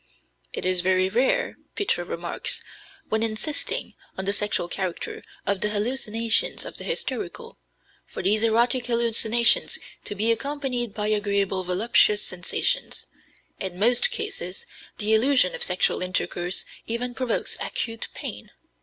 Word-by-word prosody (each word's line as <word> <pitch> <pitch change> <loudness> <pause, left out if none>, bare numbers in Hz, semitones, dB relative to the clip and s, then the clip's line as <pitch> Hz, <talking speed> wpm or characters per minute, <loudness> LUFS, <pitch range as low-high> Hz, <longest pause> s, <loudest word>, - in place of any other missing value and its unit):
"It - - -5
is 185 -1 +4
very 185 +1 +2
rare," 265 - +1 0.2
Pitres 175 - -1
remarks, 170 0 -2 0.5
when 220 0 +1
insisting 225 +7 -1 0.2
on 190 - -2
the 200 - +1
sexual 205 -4 +1
character 180 0 -4 0.2
of 200 -1 0
the 210 - +2
hallucinations 230 - 0
of - - -8
the - - -7
hysterical, 485 -1 -4 0.5
"for - - -7
these 215 +2 +3
erotic 235 +3 +2
hallucinations 235 0 +3 0.3
to 205 - -3
be 220 +3 +4
accompanied 255 -3 -2
by 210 0 -1
agreeable 200 -2 0
voluptuous 210 +3 +3
sensations. 185 - -2 0.5
In 185 -2 -3
most 240 - +6
cases 405 - -3 0.3
the 215 +1 +2
illusion 240 -4 +4
of - - -6
sexual 180 0 +1
intercourse 180 0 -1 0.2
even 245 +2 -2
provokes 250 -2 -1
acute 225 -1 -2
pain. - - -5
215 Hz, 130 wpm, -25 LUFS, 190-245 Hz, 0.5 s, most